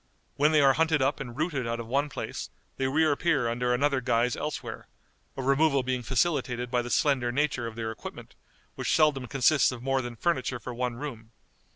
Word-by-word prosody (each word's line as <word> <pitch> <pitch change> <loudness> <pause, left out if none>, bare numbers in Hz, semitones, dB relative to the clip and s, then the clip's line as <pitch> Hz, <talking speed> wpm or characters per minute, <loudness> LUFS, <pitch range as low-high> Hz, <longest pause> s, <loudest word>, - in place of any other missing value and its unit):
When 150 +2 +3
they 155 -1 +5
are 135 -1 +6
hunted 160 +1 +2
up 135 +3 0
and 120 -2 -7
rooted 150 -6 -1
out 115 0 -2
of 115 - -5
one 140 +5 0
place, - - -5 0.3
they 135 - 0
reappear 150 -1 +2
under 125 +1 0
another 135 +1 +2
guise 120 0 +1
elsewhere; 150 - -5 0.5
a 135 - -3
removal 140 0 +3
being 125 0 -1
facilitated 125 -1 0
by 125 - +2
the 120 - -6
slender 130 -3 +2
nature 135 -3 0
of 115 - -8
their 110 -1 -3
equipment, 110 - -9 0.4
which - - 0
seldom 150 -5 +3
consists 135 +2 +3
of 125 -1 -8
more 135 0 +1
than 120 -1 -6
furniture 130 -3 -1
for 125 +2 -7
one 125 0 -2
room. 120 -4 -8
130 Hz, 195 wpm, -28 LUFS, 120-145 Hz, 0.5 s, are